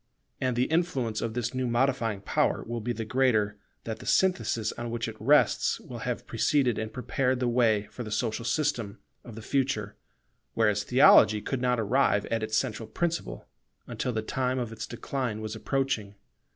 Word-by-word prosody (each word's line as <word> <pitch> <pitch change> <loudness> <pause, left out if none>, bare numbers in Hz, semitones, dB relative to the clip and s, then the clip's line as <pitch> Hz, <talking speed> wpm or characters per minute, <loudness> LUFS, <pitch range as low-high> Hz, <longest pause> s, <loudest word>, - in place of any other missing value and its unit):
And 130 -2 0
the 120 - +2
influence 135 -8 0
of 115 -1 -3
this 120 0 -2
new 130 -1 -1
modifying 120 -4 0
power - - 0
will 115 0 -4
be 120 +3 -2
the 115 -1 -4
greater 110 -4 +1 0.2
that 110 -1 -5
the - - -10
synthesis 180 - +1
on 120 0 -6
which 115 0 -3
it 115 - -6
rests 145 +7 +3
will - - -9
have - - -3
preceded 140 -6 +1
and 110 0 -4
prepared 130 +1 -1
the 125 - 0
way 115 -4 +3
for - - -8
the 110 - -7
social 115 +1 -2
system 120 -5 -1 0.3
of 120 -3 -10
the 115 - -9
future; 125 -7 -1 0.6
whereas 105 -2 +2
theology 115 -4 +6
could 125 +4 -3
not 125 -1 +1
arrive 110 -1 +2
at 115 -1 0
its 110 0 0
central 110 +1 -2
principle, 165 - -3 0.4
until 125 - -3
the 110 -2 -2
time 130 +1 -1
of 120 -3 -3
its 115 - -6
decline 120 -2 -3
was 110 0 -5
approaching. 110 -4 -2
120 Hz, 180 wpm, -28 LUFS, 110-130 Hz, 0.6 s, theology